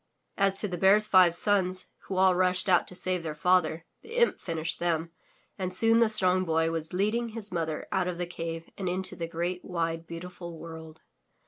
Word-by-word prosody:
As 195 -1 +1
to 210 - +1
the 180 -3 -5
Bear's 200 +3 +5
five 185 -4 +5
sons, 185 -1 +1 0.2
who 190 - -4
all 185 0 +5
rushed 185 +1 +1
out 180 -2 +3
to 180 - -8
save 185 0 -2
their 155 -2 -5
father, 170 -1 +1 0.2
the 455 +2 -10
imp 475 -1 +3
finished 165 -2 -3
them, 165 -1 -1 0.5
and 185 -1 -2
soon 225 +3 +5
the 230 -2 +4
Strong 185 -3 +2
Boy 160 -1 +1
was 160 -1 -4
leading 215 +6 0
his 215 -2 -7
mother 160 -3 -3
out 185 -1 0
of 180 -1 -3
the 175 - -2
cave 165 -1 -6
and 185 -2 -2
into 185 +1 -1
the 165 - -4
great, 175 +2 -3
wide, 165 -2 -3
beautiful 170 0 -8
world. 160 -1 -10
180 Hz, 200 wpm, -28 LUFS, 165-190 Hz, 0.5 s, Bear's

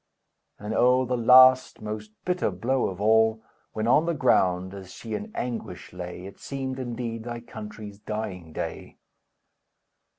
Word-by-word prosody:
And 105 +1 -5
oh, 125 +2 +4
the 125 +1 -1
last, 130 +2 +6
most 105 0 -6 0.2
bitter 180 -7 0
blow 120 +8 0
of 95 -1 -6
all, 110 +1 +3 0.3
When 110 +1 -2
on 150 +7 +4
the 170 - 0
ground, 95 -8 +2
as 95 -2 -9
she 110 +4 -8
in 215 - -4
anguish 115 -9 -5
lay, 90 0 -7
It 100 - -11
seemed, 135 -1 -5
indeed, 120 -2 -4
thy 120 0 -5
country's 110 -2 -9
dying 105 -6 -5
day! - - -6
110 Hz, 145 wpm, -26 LUFS, 100-125 Hz, 0.3 s, last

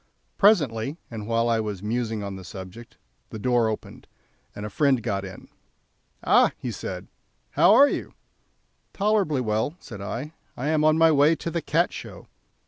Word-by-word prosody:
Presently, 145 - +3
and 110 -2 -6
while 115 0 +1
I 115 -1 +2
was 105 -3 -4
musing 110 -1 -2
on 100 -1 -5
the 95 - -9
subject, 95 +6 -10 0.3
the - - -7
door 120 +1 +2
was 110 - +1
opened, - - -11 0.5
and 105 - -6
a - - -5
friend 135 -2 +2
got 100 -2 -2
in. 95 -1 -10 0.8
"Ah!" - - +4 0.2
said - - -6
he, - - -24 0.4
"how 175 +8 +5
are 280 +4 +8
you?" - - -4 0.8
"Tolerably 200 -9 +1
well," 110 +6 -1
said 105 -4 -10
I; 125 +9 -5 0.2
"I 135 +5 -2
am 155 -1 +2
on 155 0 +4
my 165 0 +5
way 150 +2 +4
to 165 - -5
the 170 - -2
Cat 165 +4 +1
Show." - - -9
120 Hz, 175 wpm, -25 LUFS, 105-155 Hz, 0.8 s, are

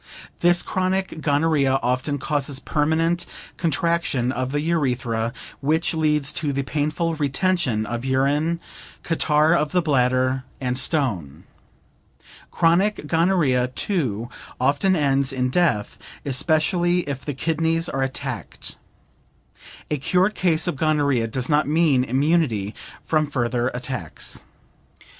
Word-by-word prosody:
This 175 0 +4
chronic 185 -2 -1
gonorrhea 145 -3 +2
often 130 +4 0
causes 140 -1 -2
permanent 165 +5 0 0.3
contraction 165 -6 0
of 130 +1 -3
the 145 - 0
urethra, 125 -8 0 0.3
which 160 +5 +1
leads 150 -3 +1
to 150 -3 -1
the 140 0 -1
painful 155 +4 -1
retention 145 - 0
of 120 +2 -4
urine, 140 +5 +1 0.4
catarrh 155 -1 +2
of 155 -2 +1
the 180 - +3
bladder, 130 -2 +2 0.2
and 125 -2 -1
stone. 115 - -1 1.1
Chronic 175 +2 +2
gonorrhea, 160 -6 +2
too, 125 - -2 0.3
often 145 +9 +2
ends 140 -3 +2
in 125 -1 -1
death, 150 - +1 0.3
especially 170 +5 +2
if 140 -4 -5
the 145 - -4
kidneys 165 +3 0
are 135 - -2
attacked. 135 0 -4 1.1
A 150 - +1
cured 185 +8 +2
case 170 -6 +1
of 175 -6 -2
gonorrhea 145 -6 +1
does 125 +3 -3
not 150 -1 +2
mean 150 -4 +3
immunity 130 - +1 0.3
from 155 -1 +1
further 120 -3 0
attacks. 125 - -4
145 Hz, 115 wpm, -23 LUFS, 130-165 Hz, 1.1 s, This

